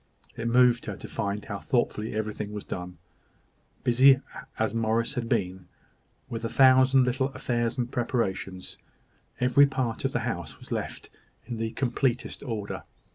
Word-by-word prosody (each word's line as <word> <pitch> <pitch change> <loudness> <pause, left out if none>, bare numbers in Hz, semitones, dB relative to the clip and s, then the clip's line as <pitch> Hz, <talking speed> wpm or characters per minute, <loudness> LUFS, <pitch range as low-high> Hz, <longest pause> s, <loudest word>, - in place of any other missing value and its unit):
It 115 - -3
moved 120 0 +4
her - - -3
to - - -9
find 100 +1 -3
how 100 -1 -5
thoughtfully 110 -3 -1
everything 105 -1 -3
was 105 - -5
done. 90 -1 -6 0.9
Busy 130 +2 +6 0.4
as 110 +1 0
Morris 115 +1 0
had 120 -4 -3
been 90 -1 -1 0.6
with 115 0 -5
a 115 - -1
thousand 130 0 +6
little 130 +2 +1
affairs 120 0 -1
and 125 -1 -2
preparations, 95 -6 -2 0.6
every 125 +3 +5
part 130 -4 -2
of - - 0
the - - -1
house - - -4
was - - -15
left - - -4 0.3
in 120 -2 -5
the 115 0 -1
completest 125 0 -1
order. 110 -6 -4
115 Hz, 150 wpm, -27 LUFS, 105-125 Hz, 0.9 s, Busy